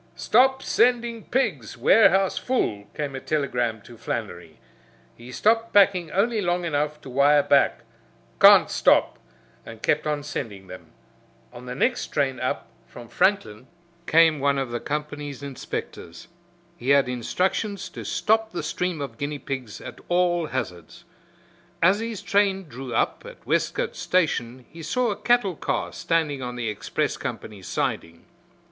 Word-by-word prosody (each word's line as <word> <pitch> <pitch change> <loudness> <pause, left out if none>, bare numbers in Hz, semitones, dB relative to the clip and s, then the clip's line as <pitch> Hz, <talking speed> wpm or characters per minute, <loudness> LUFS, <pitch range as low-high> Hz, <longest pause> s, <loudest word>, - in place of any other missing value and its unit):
"Stop 265 +3 +3
sending 235 -2 +1
pigs. 265 +1 -1
Warehouse 195 -3 +4
full," 105 - -1
came 145 -2 -3
a - - -4
telegram 125 -7 -1
to 120 -2 -14
Flannery. 90 -9 -5 0.6
He 120 +1 -12
stopped 225 - +1
packing 190 -4 +4
only 215 +5 +1
long 175 -1 0
enough 150 -1 -1
to 135 - -10
wire 145 +2 +4
back, 140 -3 +3 0.6
"Can't - - +7
stop," - - +3 0.4
and 115 -1 -12
kept 150 +1 +1
on 150 -1 -1
sending 105 -9 -6
them. 90 -2 -11 0.7
On 125 +1 -11
the 125 - -5
next 250 - 0
train 135 -3 -1
up 125 -2 -2 0.2
from 120 -2 -12
Franklin 130 - 0 0.4
came 160 -2 +5
one 140 0 +1
of 135 -3 -2
the 120 - -2
company's 145 -1 -5
inspectors. 140 -3 -7 0.5
He 125 - -5
had 140 -2 +5
instructions 185 - -2
to - - -8
stop 220 0 0
the 175 - -3
stream 165 0 -2
of 125 -5 -7
guinea 145 +1 -3
pigs 130 -6 -6
at - - -10
all 175 -2 +2
hazards. 90 - -6 0.8
As 185 +5 +4
his 225 -3 -5
train 200 -2 +1
drew 130 -1 -8
up - - 0
at - - -13
Westcote - - -1
station 130 -8 -1
he 165 - -10
saw 235 +9 0
a - - -2
cattle 240 -7 +1
car - - -3
standing 155 -5 -1
on 125 -1 -5
the 120 -2 -3
express 105 - -2
company's 100 -4 -7
siding. 85 0 -3
150 Hz, 150 wpm, -24 LUFS, 125-190 Hz, 0.8 s, Can't